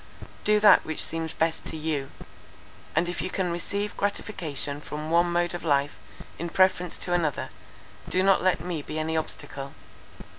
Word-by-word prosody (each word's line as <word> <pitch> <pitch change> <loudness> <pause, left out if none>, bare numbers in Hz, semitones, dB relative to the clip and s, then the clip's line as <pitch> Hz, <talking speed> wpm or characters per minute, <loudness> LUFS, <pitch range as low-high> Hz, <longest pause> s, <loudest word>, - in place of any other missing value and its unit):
Do 210 0 +4
that 210 0 +7
which 160 - 0
seems 165 -1 -3
best 160 0 0
to 160 - -5
you: 150 -3 -2 0.9
and 175 - +3
if 175 - -3
you 185 - -2
can 185 -2 -1
receive 200 +4 -2
gratification 155 -8 -2
from 150 +1 -5
one 170 +1 +4
mode 175 0 +1
of 175 - -5
life 145 -2 +1 0.4
in 170 +1 -3
preference 180 -1 +3
to 175 - -2
another, 160 -5 0 0.6
do 185 +1 +2
not 195 0 +5
let 185 -3 +2
me 170 -2 -3
be 155 +2 -6
any 160 +1 -1
obstacle. 140 -3 -4
170 Hz, 170 wpm, -27 LUFS, 155-180 Hz, 0.9 s, that